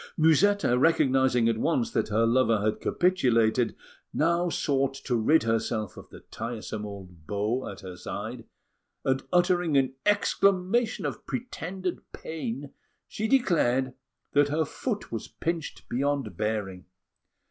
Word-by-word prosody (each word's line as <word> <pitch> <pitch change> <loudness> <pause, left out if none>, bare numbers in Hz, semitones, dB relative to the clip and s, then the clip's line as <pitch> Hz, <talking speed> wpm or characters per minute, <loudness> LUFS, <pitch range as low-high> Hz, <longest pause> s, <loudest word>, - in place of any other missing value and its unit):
Musetta, 160 -3 +4
recognising 130 -6 +3
at 115 -1 +1
once 230 - +1
that - - 0
her 110 +2 +2
lover 115 -2 +3
had 105 +1 -1
capitulated, 125 -10 +2 0.4
now 170 +2 +1
sought 135 -4 0
to 135 -2 -2
rid 130 +8 +4
herself 110 -3 -1
of - - -12
the - - -12
tiresome 110 -2 -6
old 90 -5 -11
beau 105 +5 -1
at 100 - -9
her 90 -1 -8
side; 90 - -6 0.6
and, 130 0 +1
uttering 175 -4 +3
an 130 -1 +2
exclamation 200 0 +2
of 135 -6 -5
pretended 185 -7 -4
pain, 145 -3 -5 0.3
she 220 - -3
declared 135 - +2 0.4
that 145 0 +4
her 155 +2 +1
foot 210 - -4
was 115 - -4
pinched 165 -1 -4
beyond 135 -5 -1
bearing. 100 -3 -3
135 Hz, 130 wpm, -27 LUFS, 115-170 Hz, 0.6 s, Musetta